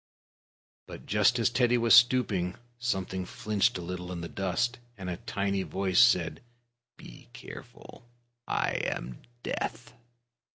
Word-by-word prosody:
But - - -10
just 105 +4 +3
as 115 0 +2
Teddy 120 0 +3
was 115 -1 +4
stooping, 115 -7 +4 0.2
something 95 -5 -2 0.2
wriggled 105 -3 +2
a - - -6
little 90 +1 -6
in 85 -2 -5
the 85 - -5
dust, 100 +8 -1 0.2
and 95 -2 -5
a 85 - -4
tiny 100 0 -2
voice 95 -1 0
said: 90 -9 +4 0.6
"Be - - -13
careful. 120 - -12 0.4
I - - 0
am - - -4 0.2
Death!" 120 +2 -4
100 Hz, 130 wpm, -29 LUFS, 90-120 Hz, 0.6 s, was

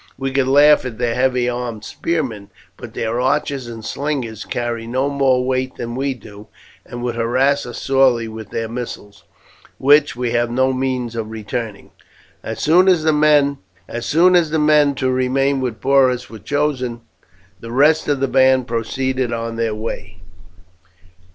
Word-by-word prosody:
We 135 0 -3
could 135 -1 +1
laugh 145 +2 +5
at 125 -4 -6
their 120 -1 0
heavy 125 -1 +1
armed 120 -3 -4
spearmen, 130 -12 -3 0.3
but - - -11
their 115 +2 -2
archers 130 0 -1
and 115 -2 -8
slingers 130 -7 -3
carry 120 -1 -3
no 130 +4 -1
more 130 -2 +2
weight 130 0 -1
than 120 0 -5
we 135 0 -1
do, 105 -3 -13 0.4
and 120 0 -8
would 120 -1 -1
harass 130 +4 +1
us 120 - -7
sorely 130 -4 +2
with 110 -1 -9
their 115 0 -3
missiles, 115 -3 -8 0.5
which 145 +2 +4
we 120 -1 -2
have 120 0 +1
no 130 +2 +1
means 130 -2 -2
of 110 -2 -4
returning." 110 -1 -6 0.5
As 110 - -6
soon 175 +5 +4
as 180 -4 +4
the 155 -1 +3
men 150 - +2
to 130 -1 0
remain 135 +2 +1
with 120 -4 -3
Porus 130 -3 +2
were 110 - -9
chosen, 130 -1 -2 0.6
the 115 - -9
rest 150 +5 +3
of 145 -2 +1
the 135 - +2
band 130 -1 +3
proceeded 130 +2 -2
on 115 0 -3
their 115 -2 -1
way. 100 -4 -6
125 Hz, 155 wpm, -19 LUFS, 115-140 Hz, 0.6 s, laugh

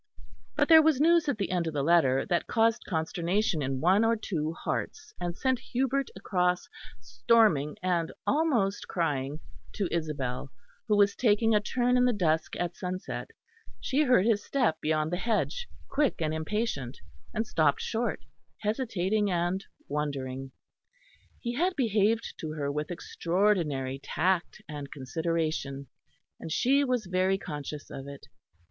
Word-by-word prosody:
But - - +2
there 320 -1 +9
was 310 -4 +3
news 330 0 +4
at 270 - 0
the 200 -3 -2
end 175 -2 0
of 160 - -4
the 140 - 0
letter 140 -5 +3
that 175 -2 0
caused 225 -1 +2
consternation 170 +2 0
in 135 -1 -2
one 190 +6 +4
or 230 0 +3
two 160 -8 -2
hearts, 345 - -4
and 175 0 -3
sent 260 -2 +1
Hubert 265 +2 -1
across, 180 -2 0 0.3
storming 145 - +2
and 175 -3 0
almost 255 -11 +1
crying, 150 -4 -1 0.3
to 200 - -1
Isabel, 140 -6 -3 0.4
who 210 -2 +3
was 200 -1 +4
taking 225 -1 +3
a 210 - +5
turn 250 +3 +1
in 250 - +4
the 250 - +3
dusk 160 -6 0
at 175 0 -2
sunset. 185 0 -5 0.5
She 275 +3 +1
heard 250 -9 +4
his 220 -3 +2
step 245 - 0
beyond 155 +1 0
the 175 - 0
hedge, 235 - -1 0.2
quick 285 -1 +1
and 155 -1 0
impatient, 160 - -2 0.3
and 220 +1 -1
stopped 155 -8 +2
short, 235 +1 -2 0.4
hesitating 210 -3 0
and 175 +2 0 0.2
wondering. 135 -3 -3 0.9
He 240 -1 -3
had 355 +8 +1
behaved 220 -2 +1
to 155 -1 -4
her 145 -2 -2
with 150 +1 -3
extraordinary 170 -7 0
tact 185 +6 -1
and 145 -3 -7
consideration, 150 -1 -2 0.5
and 160 - -7
she 275 - +3
was 250 -5 0
very 185 +1 +1
conscious 150 -3 -7
of 135 0 -7
it. 140 0 -10
180 Hz, 150 wpm, -29 LUFS, 155-225 Hz, 0.9 s, there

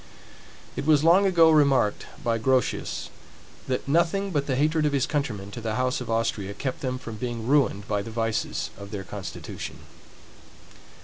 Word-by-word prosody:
It 140 - -4
was 150 -2 +5
long 180 +5 +6
ago 165 -3 +6
remarked 140 -8 +3 0.2
by 115 -1 +1
Grotius, 130 +2 0 0.6
that 130 0 -2
nothing 170 +6 +2
but 145 -4 0
the 135 - +1
hatred 155 +3 +2
of 145 - -1
his 135 -2 +2
countrymen 110 -10 -3
to 120 - -7
the 110 -1 -2
house 125 +2 0
of 125 - -6
Austria 110 -3 -1
kept 130 +3 -4
them 130 -1 -2
from 115 -3 -8
being 120 -1 -4
ruined 125 -7 +2
by 105 - 0
the 100 - -7
vices 115 -1 -2
of 100 0 -8
their 100 -2 -5
constitution. - - -7
130 Hz, 170 wpm, -26 LUFS, 110-150 Hz, 0.6 s, long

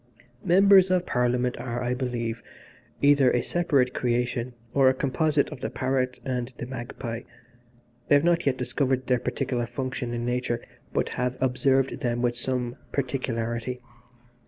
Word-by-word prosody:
"Members 190 +1 +6
of 180 -1 +2
Parliament 125 0 0
are, 120 -1 -3
I 125 0 0
believe, 120 -3 -3 0.6
either 140 -2 +6
a 125 -1 +1
separate 140 -7 +1
creation 120 0 -1 0.2
or 135 -2 +5
a 130 - +1
composite 145 +2 +1
of - - -8
the - - -2
parrot 130 -1 -1
and 125 -1 -2
the - - -5
magpie. 120 -2 -6 0.9
I - - +5
have 145 - +4
not 170 -2 +2
yet 130 -2 +2
discovered 130 +1 0
their 125 -1 +2
particular 125 -1 -2
function 125 0 -4
in 120 0 -3
nature 125 -1 -1 0.3
but - - 0
have 125 +1 -2
observed 130 +1 +1
them 120 0 -1
with 120 -1 +1
some 125 0 -2
particularity. 125 -2 -2
125 Hz, 150 wpm, -26 LUFS, 120-135 Hz, 0.9 s, Members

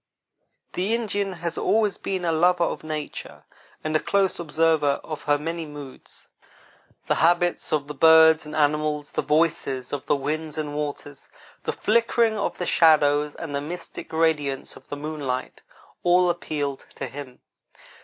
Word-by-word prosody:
The 195 +5 0
Indian 205 -4 -2
has 170 -1 -4
always 215 -2 +1
been 190 -2 -3
a 165 - +2
lover 175 +2 +3
of - - -2
nature 155 -1 -6 0.4
and 155 0 -2
a - - +5
close 195 +1 +1
observer 155 -3 +2
of 155 -2 -6
her 145 0 +3
many 165 +2 -4
moods. 145 -3 -12 0.8
The - - +2
habits 175 +1 +2
of 150 -2 +1
the 150 - -6
birds 160 +1 +6
and 150 0 -8
animals, 150 0 0
the - - -1
voices 150 -5 0
of 145 - -4
the - - +3
winds 155 +2 -3
and 150 -1 -3
waters, 145 -1 -5 0.4
the - - 0
flickering 230 0 +2
of 205 - -2
the 180 - -3
shadows, 150 -3 +4
and 160 -4 -6
the 140 - -1
mystic 170 +3 -7
radiance 155 -4 0
of - - -16
the 145 - -6
moonlight 145 -4 -4 0.4
all 180 0 +4
appealed 145 -5 -4
to - - -4
him. 135 -3 -9
155 Hz, 155 wpm, -24 LUFS, 145-175 Hz, 0.8 s, birds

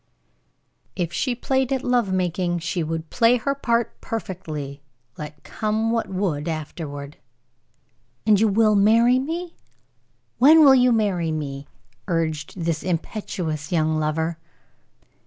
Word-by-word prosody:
If 175 -2 -2
she 255 -3 -1
played 265 +1 0
at 265 -1 0
love 245 -5 +1
making, 180 -1 0
she 175 +2 -2
would 160 0 -4
play 235 +1 +4
her 275 +4 -1
part 235 -4 -1
perfectly, 155 -10 -5 0.3
let 150 0 -9
come 220 +1 -1
what 230 -1 -1
would 185 -6 -2
afterward. 150 -2 -6 1.1
"And 210 -2 +5
you 220 - +4
will 215 +1 +3
marry 230 +5 +4
me? 335 +5 -4 0.9
When 310 +6 +8
will 270 - +8
you 250 -1 +5
marry 195 -8 +1
me?" 145 -2 -5 0.4
urged 160 -1 -2
this 165 -2 -1
impetuous 170 -3 -3
young 155 -2 +1
lover. 160 +2 -1
185 Hz, 125 wpm, -23 LUFS, 160-230 Hz, 1.1 s, When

